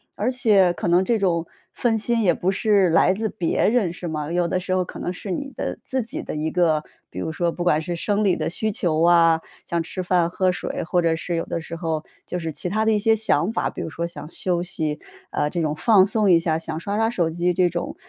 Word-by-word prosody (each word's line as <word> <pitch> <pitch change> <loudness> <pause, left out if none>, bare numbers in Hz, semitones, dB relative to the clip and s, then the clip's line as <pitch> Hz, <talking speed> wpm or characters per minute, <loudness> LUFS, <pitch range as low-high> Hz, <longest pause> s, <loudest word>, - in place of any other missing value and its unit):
而 255 - 0
且 205 -8 +4
可 - - -4
能 175 +2 +4
这 230 +3 +2
种 170 -4 +1 0.3
分 235 -2 +1
心 230 +1 0
也 175 - +4
不 185 +2 0
是 195 -2 +3
来 165 +3 +4
自 220 +2 -2
别 175 -2 0
人 215 -7 +1
是 175 0 -7
吗？ 155 0 -3
有 175 0 +1
的 185 +2 0
时 185 0 -3
候 185 - +2
可 - - -9
能 180 - -3
是 195 +2 -8
你 275 +6 -4
的 - - -3
自 260 -1 -1
己 225 - -6
的 - - -6
一 155 +1 -2
个 160 -4 +2 0.3
比 - - -12
如 160 - -3
说 170 +1 0
不 175 - -4
管 160 -3 +2
是 175 +1 -4
生 205 +4 0
理 190 -3 +3
的 - - -2
需 215 +5 -2
求 165 -5 0
啊， 165 -1 +5 0.3
像 170 -1 0
吃 185 +3 -4
饭 175 -2 +2
喝 185 +1 +1
水， 180 - -4
或 175 +1 +1
者 165 -1 +2
是 170 +1 -3
有 165 - -1
的 170 - -3
时 165 +1 -7
候， 160 -2 -2 0.2
就 180 - -3
是 160 -2 -4
其 180 - -4
他 215 +3 0
的 220 - +3
一 210 - +2
些 225 +1 +3
想 210 -3 +1
法， - - -1
比 - - -6
如 - - -4
说 170 +1 -3
想 170 -2 -8
休 175 0 -1
息， 155 -4 -3 0.3
啊， 150 - 0
这 170 +1 -2
种 150 -1 -1
放 195 +3 +5
松 205 0 +1
一 170 - +6
下， 160 -1 0
想 160 -1 -5
刷 200 +4 -3
刷 225 +1 +2
手 170 -8 0
机 175 +2 0
这 180 0 +3
种， 175 - -4
175 Hz, 280 characters per minute, -23 LUFS, 165-200 Hz, 0.3 s, 一